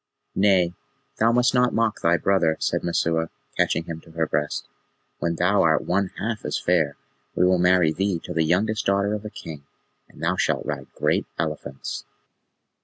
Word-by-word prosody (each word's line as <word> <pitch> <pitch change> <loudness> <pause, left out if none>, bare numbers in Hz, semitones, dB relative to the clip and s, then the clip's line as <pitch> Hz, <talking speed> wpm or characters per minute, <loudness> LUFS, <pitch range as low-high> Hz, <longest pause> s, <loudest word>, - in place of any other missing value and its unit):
"Nay, 95 -3 +3 0.5
thou 115 +1 +4
must 125 +2 +3
not 125 -1 +3
mock 115 -1 +1
thy 85 +1 +3
brother," 85 -2 +2
said - - -1
Messua, 80 -1 0 0.3
catching 80 - +1
him 80 -1 -7
to 80 - -17
her 80 0 0
breast. 75 -1 -2 0.5
"When 85 0 -1
thou 90 +4 +3
art 80 -2 +3
one 100 +2 +1
half 110 -1 -3
as - - -1
fair 80 -5 +1 0.4
we 90 - +3
will 90 0 +3
marry 90 -2 +4
thee 95 0 0
to - - -6
the 80 - +1
youngest 105 +7 +1
daughter 100 +1 +2
of 105 0 -4
a - - -4
king, 75 -7 -9 0.5
and - - -13
thou - - +1
shalt - - 0
ride - - -4
great - - +1
elephants." 75 -4 -4
90 Hz, 180 wpm, -24 LUFS, 80-100 Hz, 0.5 s, thou